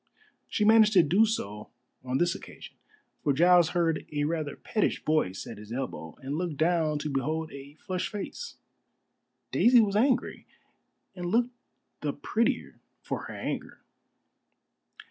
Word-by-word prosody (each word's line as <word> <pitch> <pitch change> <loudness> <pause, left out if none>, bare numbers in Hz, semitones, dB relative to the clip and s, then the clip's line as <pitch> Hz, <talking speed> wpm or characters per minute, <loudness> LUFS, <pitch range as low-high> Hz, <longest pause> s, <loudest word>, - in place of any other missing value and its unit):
She 210 - 0
managed 220 0 +6
to 180 -4 +7
do 190 +9 +4
so 105 - -4 0.3
on 130 0 -1
this 175 +3 +2
occasion, - - -11 0.5
for 145 - +2
Giles 175 +3 +5
heard 165 -2 +1
a 145 -1 -1
rather 155 -2 -2
pettish 215 - -1
voice 150 -12 0
at - - -8
his 105 +1 -11
elbow, 115 - -5
and 140 +4 -3
looked 175 -5 -3
down 160 -1 +2
to 150 +1 -3
behold 155 +4 -2
a 140 +1 -10
flushed 185 +2 -4
face. 215 - -6 1.0
Daisy 245 +1 +6
was 205 -3 +2
angry, 255 +5 +1 0.7
and 175 -1 -4
looked 240 +6 +1 0.5
the - - -2
prettier 230 +1 -1 0.2
for - - -4
her - - -8
anger. - - -5
165 Hz, 145 wpm, -28 LUFS, 145-205 Hz, 1.0 s, to